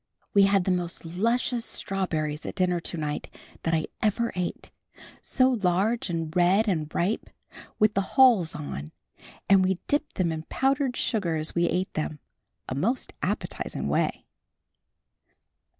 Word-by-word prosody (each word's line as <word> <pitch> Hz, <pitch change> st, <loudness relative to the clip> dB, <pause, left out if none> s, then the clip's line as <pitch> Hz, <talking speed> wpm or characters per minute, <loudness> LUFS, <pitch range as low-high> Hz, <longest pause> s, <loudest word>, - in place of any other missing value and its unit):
We 200 Hz, -1 st, +7 dB
had 195 Hz, -1 st, +3 dB
the 185 Hz, -, +1 dB
most 175 Hz, -2 st, -2 dB
luscious 230 Hz, +7 st, 0 dB
strawberries 160 Hz, -9 st, -2 dB
at -, -, -5 dB
dinner 180 Hz, -2 st, +1 dB
to 170 Hz, -, -5 dB
night, 150 Hz, -1 st, -3 dB, 0.3 s
that 165 Hz, 0 st, +1 dB
I 155 Hz, -, 0 dB, 0.2 s
ever 230 Hz, +2 st, +1 dB
ate. 180 Hz, -1 st, -4 dB, 0.5 s
So 260 Hz, -1 st, +3 dB
large 205 Hz, +1 st, +1 dB
and 165 Hz, -1 st, -3 dB
red 185 Hz, +5 st, +4 dB
and 160 Hz, -6 st, 0 dB
ripe, 185 Hz, +6 st, -1 dB, 0.5 s
with 215 Hz, 0 st, +4 dB
the 195 Hz, -, +2 dB, 0.2 s
hulls 235 Hz, -11 st, +6 dB
on 70 Hz, +1 st, -6 dB, 0.5 s
and 195 Hz, -1 st, +6 dB
we 185 Hz, 0 st, +1 dB
dipped 290 Hz, +1 st, 0 dB
them 175 Hz, -3 st, +1 dB
in 160 Hz, -1 st, -3 dB
powdered 270 Hz, -1 st, +1 dB
sugar 190 Hz, -8 st, 0 dB
as 155 Hz, 0 st, -1 dB
we 170 Hz, 0 st, +2 dB
ate 185 Hz, +1 st, -1 dB
them, 155 Hz, -1 st, -3 dB, 0.5 s
a -, -, -3 dB
most 220 Hz, -, -1 dB
appetizing -, -, -2 dB
way. -, -, 0 dB
185 Hz, 150 wpm, -27 LUFS, 165-220 Hz, 0.5 s, We